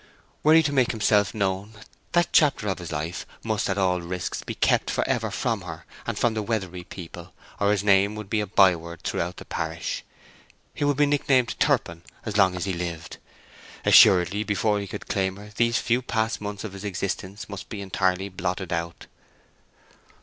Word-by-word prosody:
Were 155 +1 +6
he 165 - +6
to 145 -1 -1
make 130 -3 +3
himself 105 -2 +2
known, 100 +1 -1 0.4
that 175 0 +3
chapter 140 -8 +4
of 95 - -2
his 90 -2 -7
life 80 +3 -3 0.2
must 110 -3 -1
at 95 - 0
all 90 -2 +1
risks 85 +1 -4
be - - -6
kept - - +2
for - - 0
ever - - 0
from - - -1
her - - -8 0.2
and - - -2
from 120 - +2
the 110 - -2
Weatherbury 95 -5 -3
people, 85 -3 -10 0.3
or 100 - +2
his 105 -1 +1
name 100 +1 +4
would 105 -1 -7
be 110 +2 0
a 105 - -3
byword 85 -4 +2
throughout 90 +1 -2
the - - -9
parish. 80 0 -4 0.7
He - - -3
would 145 -1 +2
be 145 - +5
nicknamed 135 -4 +2
"Turpin" 85 0 +1 0.2
as 105 - -4
long 95 -3 +4
as 90 - -3
he 95 - -1
lived. 85 -2 -5 0.7
Assuredly 95 +3 +6
before 105 0 +1
he 100 - -5
could - - -7
claim 95 -1 0
her 105 +1 -12
these 115 +1 +2
few 120 +2 +1
past 110 -2 -1
months 105 -1 -5
of 110 -3 -6
his 100 0 -8
existence 100 0 -4
must 100 -2 -8
be 105 - -6
entirely 95 -1 0
blotted 95 -1 -3
out. 85 0 -4
100 Hz, 190 wpm, -25 LUFS, 90-110 Hz, 0.7 s, Were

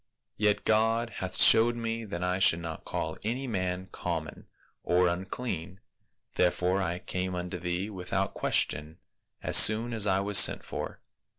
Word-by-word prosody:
Yet 105 0 +1
God 115 +2 +1
hath 95 - -3
showed 115 +2 +6
me 115 -1 -4
that 90 -4 -5
I 90 +1 0
should 85 -3 +3
not 80 -1 -7
call 80 0 -4
any 120 +5 -2
man 95 -5 -3
common 80 -3 -5 0.3
or 90 +1 +2
unclean, 95 0 -4 0.5
therefore 90 +2 +1
I 85 -1 -2
came 90 0 -4
unto 90 0 -5
thee, 90 +3 -3
without 95 0 -3
question, 75 +3 -1 0.5
as - - 0
soon 115 +3 +5
as 105 -2 +1
I 95 -1 +2
was 100 0 +4
sent - - +5
for.' - - -6
95 Hz, 155 wpm, -28 LUFS, 90-110 Hz, 0.5 s, showed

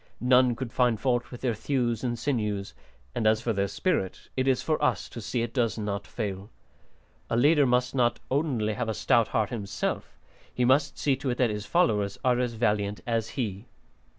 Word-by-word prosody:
None 125 0 +4
could 120 0 -6
find 120 -4 +2
fault 120 -2 0
with 125 - -9
their 125 -3 +1
thews 120 0 -1
and 120 -2 -1
sinews, 105 -7 -2 0.4
and 115 -3 0
as 110 0 +4
for 115 0 -1
their 100 -1 0
spirit, 95 - -2
it 130 0 0
is 130 -2 +2
for 155 -2 0
us - - +1
to 115 - -8
see 115 +2 -1
it 120 0 -5
does 115 -3 0
not 105 -1 -3
fail. 100 -3 -4 0.8
A 115 - +1
leader 145 +2 +5
must 125 0 +1
not 120 -3 +2
only 130 -7 0
have 120 0 -2
a 110 - -1
stout 115 +1 +3
heart 110 -1 0
himself; 100 -5 -3 0.3
he 125 - 0
must 140 +3 +3
see 140 -2 +2
to 135 - -3
it 120 - -1
that 125 -4 +2
his 105 0 -5
followers 105 - +2
are 125 -1 +3
as 125 -2 0
valiant 105 -2 0
as 115 -2 -1
he." 105 -3 -3
120 Hz, 200 wpm, -27 LUFS, 105-130 Hz, 0.8 s, leader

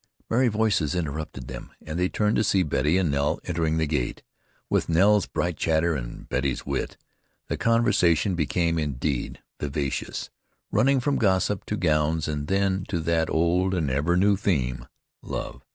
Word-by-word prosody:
Merry 125 +3 +4
voices 105 -9 +1
interrupted 75 -5 -4
them, - - -8
and 80 +2 -5
they 90 +1 +2
turned 105 0 +1
to - - +3
see 95 -2 +3
Betty 75 +2 +1
and 90 -5 +1
Nell 70 +1 0
entering 80 -2 0
the 80 - +2
gate. 75 -5 -2 0.4
With - - 0
Nell's 100 +5 +4
bright 85 -2 -2
chatter 80 +1 +2
and - - -6
Betty's 65 +1 -1
wit, 70 -1 -3 0.5
the - - 0
conversation 105 -7 +2
became 85 0 0
indeed 70 -2 -2 0.2
vivacious, 70 -2 -3 0.4
running 130 +5 +3
from 140 +2 +1
gossip 95 -1 +1
to 105 - -2
gowns, 80 -2 +1
and 75 -1 -3
then 95 0 +1
to 90 -5 -2
that 80 0 +1
old 90 +3 +2
and 80 -6 0
ever 75 +7 +1
new 100 +2 +4
theme, 65 - -1 0.3
love. - - -6
85 Hz, 160 wpm, -25 LUFS, 75-95 Hz, 0.5 s, Merry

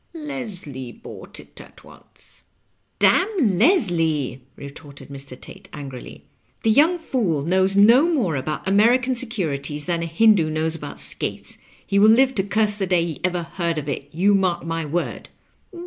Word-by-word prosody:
"Leslie 205 - -7
bought - - -12
it - - -13
at - - -17
once." - - -17 0.6
"Damn 405 +2 +3 0.2
Leslie! 165 - +1
" - - -39
retorted 140 0 -12
Mr. 135 -2 -9
Tate, - - -13
angrily. 135 -4 -9 0.2
" - - -40
The 225 - +3
young 315 +9 +4
fool 210 - -1
knows 190 +4 +1
no 245 +11 +6
more 215 - 0
about 150 +6 -4
American 245 +6 +3
Securities 155 - -3
than 170 -2 -1
a 165 - -3
Hindoo 175 -1 +3
kiiows 160 +1 -1
about - - -6
skates. - - -1 0.3
He 200 - +1
will 215 +2 +6
live 260 +4 +4
to 195 -6 0
curse 210 +1 +1
the 195 -2 -2
day 175 -2 +2
he 160 -5 -6
ever 180 -1 -1
heard 170 -1 -3
of 150 -1 -4
it, 140 0 -5
you 190 +6 +2
mark 185 -4 0
my 165 -1 -3
word." 170 +4 -4
180 Hz, 165 wpm, -22 LUFS, 155-225 Hz, 0.6 s, no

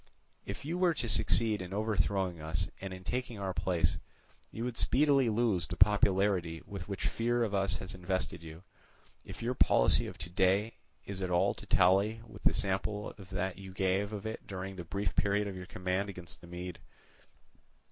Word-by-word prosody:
If - - -6
you 170 +4 -2
were 175 -3 +3
to 120 - -2
succeed 110 0 +2
in 90 +1 -5
overthrowing 100 -5 0
us 80 +4 -1
and 95 -1 -5
in 95 0 -8
taking 125 +1 -3
our 95 -2 -2
place, 90 -2 +1 0.5
you 115 - -5
would 125 -1 -3
speedily 135 0 +3
lose 105 -7 +1
the - - -5
popularity 95 -5 +3
with 100 -1 -7
which 100 -1 -4
fear 120 +1 +1
of 105 -3 -1
us 100 -1 +1
has 95 +2 -7
invested 90 -1 -2
you, 80 +1 -10 0.6
if - - -9
your 120 +2 0
policy - - +4
of - - -8
to 80 +3 -6
day 95 +5 +2 0.3
is 100 -1 -6
at 90 - -1
all 90 0 +3
to - - -12
tally 100 +5 +4
with - - -12
the - - +4
sample 100 +2 0
that 95 -1 -3
you 95 -1 -9
gave 95 +2 +1
of 105 -1 -5
it 110 0 -5
during 95 0 -5
the 90 - -6
brief 100 +4 -2
period 100 +1 +2
of 100 - -5
your 90 -1 -7
command 95 +2 -1
against 90 -3 -8
the 85 - -12
Mede. 90 0 -6
95 Hz, 190 wpm, -32 LUFS, 90-105 Hz, 0.6 s, policy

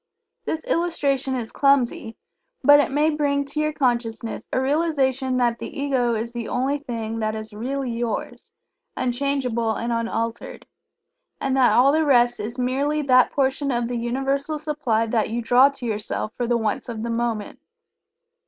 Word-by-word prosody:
This 320 0 -3
illustration 280 -6 0
is 235 -3 -4
clumsy, 260 -5 +1 0.5
but 290 0 +8
it - - +2
may 300 +3 +2
bring 285 -2 0
to 290 +2 -5
your 305 0 +1
consciousness 235 -5 -2
a - - +1
realization 265 -3 +1
that 240 -2 +1
the - - -6
Ego 260 -4 +1
is 230 +2 -4
the 235 -2 -4
only 270 +3 0
thing 225 -4 -4
that 215 0 -1
is 215 0 -7
really 255 +4 -3
Yours, 230 0 -4 0.5
unchangeable 245 -3 -1
and 235 0 -2
unaltered, 230 0 -3 0.7
and 265 -1 0
that 260 -2 +4
all 265 +3 +5
the 315 +2 +2
rest 245 -4 +3
is 220 +4 -5
merely 280 +4 0
that 255 -2 +5
portion 275 +1 0
of 240 -2 0
the 245 - -3
Universal 270 +5 -1
supply 295 -7 -1
that 225 -1 0
you 230 +2 -2
draw 245 +4 +5
to 275 -3 -9
yourself 215 0 -3
for 245 - -2
the 240 0 +2
wants 220 +2 -2
of 225 -2 -5
the 235 - -2
moment. 230 -2 -2
250 Hz, 165 wpm, -23 LUFS, 230-280 Hz, 0.7 s, but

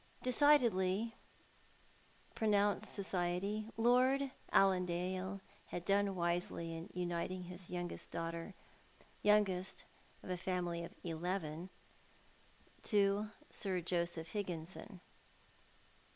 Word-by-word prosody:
Decidedly, 230 -6 +4 1.2
pronounced 205 -2 +2
society. 195 +2 -1
Lord 255 +4 +4 0.2
Allandale 185 0 +2 0.3
had 175 - -5
done 200 0 +3
wisely 170 -1 -1
in 165 +4 -6
uniting 180 +1 -2
his 180 0 -9
youngest 175 -1 -4
daughter— 165 +3 -4 0.7
youngest 200 -3 +2 0.4
of - - -5
a 180 - 0
family 175 -2 -1
of 170 - -8
eleven 170 0 -3 0.5
— - - -28
to 205 0 +3 0.2
Sir 190 -3 0
Joseph 170 -1 -1
Higginson. 185 0 -5
185 Hz, 90 wpm, -37 LUFS, 175-205 Hz, 1.2 s, Decidedly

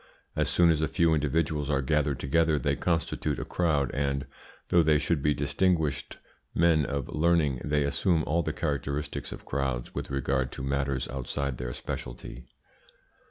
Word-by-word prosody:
As - - +1
soon 85 -1 +5
as 80 -1 +1
a 80 - +2
few 85 +1 +2
individuals 75 0 0
are 70 -2 +1
gathered 75 -1 +1
together 80 +2 +2
they 70 -1 0
constitute 85 0 -1
a - - -4
crowd, 75 -7 +1
and, 70 -1 -1 0.4
though 85 - +5
they 75 -1 +4
should 75 0 0
be 75 0 +2
distinguished 75 -1 0 0.4
men 80 -3 +4
of 70 -3 -2
learning, 75 -5 +2
they 75 0 +1
assume 80 +4 +1
all 85 +3 +1
the - - -2
characteristics 75 -1 -3
of - - -9
crowds 65 -3 -2
with - - -4
regard 65 -1 0
to - - -6
matters 70 -1 -1
outside 70 0 -3
their 60 -1 -3
speciality. - - -7
75 Hz, 160 wpm, -28 LUFS, 70-80 Hz, 0.4 s, soon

